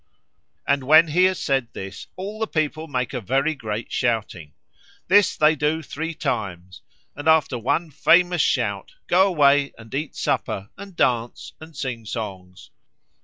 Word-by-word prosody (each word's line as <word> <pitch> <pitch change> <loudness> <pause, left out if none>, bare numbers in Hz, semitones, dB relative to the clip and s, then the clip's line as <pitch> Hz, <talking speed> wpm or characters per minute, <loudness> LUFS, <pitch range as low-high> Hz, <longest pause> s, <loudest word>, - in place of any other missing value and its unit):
And 140 -1 +1
when 155 +3 +6
he 180 +5 +4
has 185 -1 +1
said 135 -3 0
this, 95 0 -8
all 200 +3 -6
the 220 - -1
people 155 -1 -2
make 125 -2 -3
a 125 - -3
very 135 - 0
great 110 -5 -5
shouting. 105 - -2 0.6
This 200 0 +4
they 155 +1 +4
do 150 +2 -1
three 160 +3 -5
times, 90 - -4 0.3
and 145 +2 -6
after 155 -6 +3
one 155 +8 -1
famous 175 +3 +3
shout 100 -8 -1
go 190 +2 +4
away 145 -5 +3
and 115 +1 -14
eat 145 +2 -3
supper, 100 +2 -2
and 200 -2 -11
dance, 120 -5 -1
and 160 -2 -12
sing 125 -6 -4
songs." 95 -5 -7
140 Hz, 155 wpm, -23 LUFS, 115-160 Hz, 0.6 s, when